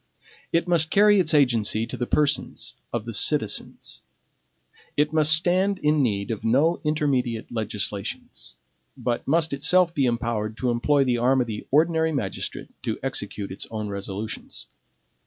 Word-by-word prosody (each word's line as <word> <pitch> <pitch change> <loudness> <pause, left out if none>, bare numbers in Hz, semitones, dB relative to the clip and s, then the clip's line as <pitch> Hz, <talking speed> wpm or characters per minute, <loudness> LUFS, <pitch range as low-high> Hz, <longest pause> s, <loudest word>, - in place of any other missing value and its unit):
It 170 +1 +1
must 165 -3 +2
carry 205 +2 +5
its 170 -4 +2
agency 115 -6 +2
to - - -6
the 120 - -3
persons 150 -2 0 0.2
of - - -3
the - - -5
citizens. - - 0 1.0
It 150 +1 +1
must 155 -1 +5
stand 185 +4 +3
in 150 -2 +2
need 100 -4 -1
of 110 - -5
no 140 +9 +2
intermediate 135 -7 -1
legislations; 105 -3 -5 0.4
but 120 -1 -3
must 160 +1 +1
itself 170 +5 +2
be 140 -5 +1
empowered 115 -2 -2
to 125 -2 0
employ 140 +4 +2
the 125 -2 0
arm 130 +2 +3
of - - 0
the 110 -2 -7
ordinary 160 +2 +2
magistrate 115 -11 -4
to - - -3
execute 100 -2 -4
its 95 - -6
own 110 -2 -4
resolutions. 100 +2 -6
135 Hz, 150 wpm, -24 LUFS, 110-160 Hz, 1.0 s, carry